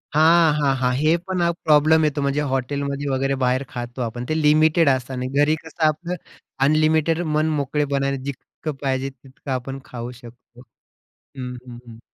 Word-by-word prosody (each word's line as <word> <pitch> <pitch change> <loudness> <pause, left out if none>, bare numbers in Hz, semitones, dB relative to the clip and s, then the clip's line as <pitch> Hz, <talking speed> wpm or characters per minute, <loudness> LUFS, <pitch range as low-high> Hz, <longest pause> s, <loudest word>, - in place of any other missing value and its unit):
हां, 160 0 +5
हां, 140 -2 +2
हां. 125 -1 +1
हे 155 +4 +3
पण 185 -1 -1
आ 170 - +3 0.2
प्रॉब्लेम 155 +1 +5
येतो, 150 -1 0
म्हणजे 140 +1 0
हॉटेलमध्ये 140 +2 -2
वगैरे 135 +1 0
बाहेर 130 +2 +1
खातो 120 +1 -6
आपण, 120 +1 -4
ते 155 0 0
लिमिटेड 155 +1 +4
असतं, 130 -1 -1
आणि 125 0 -3
घरी 150 +2 +3
कसं 160 0 -6
आपलं 170 +4 -2 0.5
अनलिमिटेड 155 +2 +2
मन-मोकळेपणानं, 145 -2 0
जितकं 140 +2 -6
पाहिजे 135 -1 -1
तितकं 135 +1 -11
आपण 130 +1 -3
खाऊ 120 0 -7
शकतो. 120 0 -15 0.5
हं, 125 -2 -9
हं, 120 -1 -10
हं. 115 -1 -12
140 Hz, 160 wpm, -22 LUFS, 130-155 Hz, 0.5 s, हां